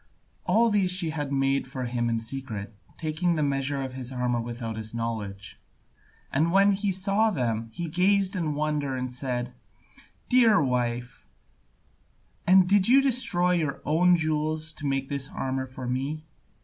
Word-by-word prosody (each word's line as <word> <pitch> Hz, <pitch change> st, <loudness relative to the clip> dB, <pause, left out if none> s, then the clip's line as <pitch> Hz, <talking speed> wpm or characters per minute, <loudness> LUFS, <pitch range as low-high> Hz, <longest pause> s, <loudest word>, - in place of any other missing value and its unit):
All 225 Hz, +5 st, +4 dB
these 200 Hz, -3 st, +2 dB
she 180 Hz, -3 st, +1 dB
had 145 Hz, -3 st, -4 dB
made 135 Hz, 0 st, +1 dB
for 130 Hz, -1 st, -5 dB
him 120 Hz, -1 st, -1 dB
in 115 Hz, -, 0 dB
secret, 110 Hz, -3 st, -6 dB, 0.2 s
taking 165 Hz, +2 st, 0 dB
the 155 Hz, -, 0 dB
measure 140 Hz, 0 st, 0 dB
of 130 Hz, -1 st, -6 dB
his 130 Hz, -1 st, -5 dB
armour 125 Hz, -2 st, -1 dB
without 115 Hz, -1 st, -5 dB
his 110 Hz, +1 st, -5 dB
knowledge. 110 Hz, -4 st, -5 dB, 0.7 s
And 160 Hz, +5 st, +1 dB
when 195 Hz, +2 st, +5 dB
he 200 Hz, +1 st, 0 dB
saw 195 Hz, +4 st, +2 dB
them, 115 Hz, -, -2 dB
he 170 Hz, +9 st, -5 dB
gazed 190 Hz, +4 st, +2 dB
in 160 Hz, -5 st, -1 dB
wonder 150 Hz, -2 st, -1 dB
and 130 Hz, -1 st, -3 dB
said: 125 Hz, -1 st, -3 dB, 0.7 s
"Dear 235 Hz, -5 st, +5 dB
wife, 120 Hz, -3 st, -2 dB, 1.2 s
and 185 Hz, 0 st, +6 dB
did 195 Hz, 0 st, +4 dB
you 270 Hz, +3 st, +6 dB
destroy 225 Hz, -9 st, +2 dB
your 160 Hz, -6 st, 0 dB
own 175 Hz, +4 st, +4 dB
jewels 155 Hz, -1 st, -1 dB
to 150 Hz, -2 st, -6 dB
make 135 Hz, -1 st, -1 dB
this 140 Hz, 0 st, -2 dB
armour 130 Hz, 0 st, -3 dB
for 130 Hz, 0 st, -8 dB
me?" 135 Hz, +5 st, -3 dB
145 Hz, 160 wpm, -26 LUFS, 125-180 Hz, 1.2 s, and